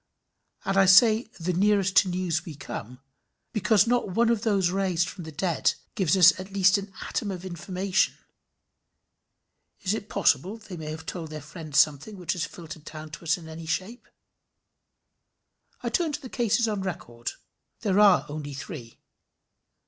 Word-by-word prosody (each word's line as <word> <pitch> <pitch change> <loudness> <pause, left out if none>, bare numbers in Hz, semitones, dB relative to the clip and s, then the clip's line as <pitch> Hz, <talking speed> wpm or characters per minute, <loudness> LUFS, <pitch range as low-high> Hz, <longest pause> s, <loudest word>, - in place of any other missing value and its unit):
And 195 0 0
I 195 -1 +6
say 220 +4 +6
the 175 +2 -1
nearest 195 0 +2
to 190 - +6
news 175 -3 -1
we 165 -4 -8
come, 125 -3 -7 0.5
because 215 -1 +4
not 240 -3 +1
one 235 0 +4
of 230 -3 +1
those 195 -5 +2
raised 185 -3 +1
from 180 -4 -8
the 160 - -7
dead 160 -1 0 0.2
gives 190 -1 +2
us 185 +1 +7
at 190 +1 -8
least 195 0 +4
an 200 0 -9 0.2
atom 210 - -2
of 185 -1 -5
information. 185 +2 0 1.7
Is 190 - 0
it 215 -1 -5
possible 190 - +1
they 215 -4 -10
may 155 -2 -6
have 155 +1 -7
told 165 -3 -5
their 155 0 -6
friends 155 0 -6
something 150 +8 +2
which 180 -2 -2
has 180 0 -2
filtered 160 -2 -10
down 155 0 -9
to 165 - -10
us 165 +4 +2
in 165 -2 -11
any 160 0 -8
shape? 200 +9 -3 1.8
I - - -1
turn 335 -4 0
to 290 - -4
the 255 - -8
cases 235 -1 +1
on 210 -3 -2
record. 120 -11 -5 0.5
They 205 - 0
are 200 -1 +5
only 145 -1 -6
three. 135 - -8
185 Hz, 170 wpm, -26 LUFS, 160-200 Hz, 1.8 s, us